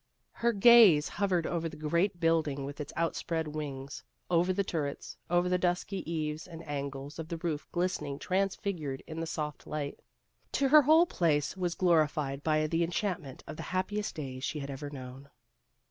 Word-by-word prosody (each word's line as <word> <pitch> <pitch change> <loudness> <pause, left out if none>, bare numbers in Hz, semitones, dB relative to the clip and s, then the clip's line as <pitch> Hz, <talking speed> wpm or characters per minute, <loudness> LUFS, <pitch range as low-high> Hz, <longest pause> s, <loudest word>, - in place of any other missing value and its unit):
Her 235 0 +1
gaze 210 -8 +7
hovered 185 -5 0
over 165 -1 -1
the 155 - -11
great 170 +5 0
building 155 -5 +1
with 145 +2 -6
its 145 - -6
outspread 165 -1 -1
wings 140 -3 -6 0.3
over 175 +2 +3
the 200 +2 +1
turrets, 150 -6 -4
over 175 +1 +3
the 180 0 +1
dusky 180 0 -1
eaves 155 0 -3
and 165 -2 -10
angles 140 +1 -5
of 160 - -5
the 170 0 -4
roof 160 -3 -3
glistening 175 -6 -1
transfigured 185 -6 -2
in 160 0 -6
the 165 - -3
soft 150 -2 -4
light. 145 -2 -4 0.5
To 275 -1 +2
her 305 +2 +9
the - - -7
whole 320 +4 +7
place 155 - +1
was 175 -2 -2
glorified 155 -5 +2
by 155 0 +2
the 165 +2 +1
enchantment 175 -5 -3
of - - -8
the - - -5 0.2
happiest 205 +3 -2
days 130 -4 -6
she 155 - -2
had 140 -1 -5
ever 145 +2 -6
known. 135 0 -9
160 Hz, 175 wpm, -31 LUFS, 145-180 Hz, 0.5 s, her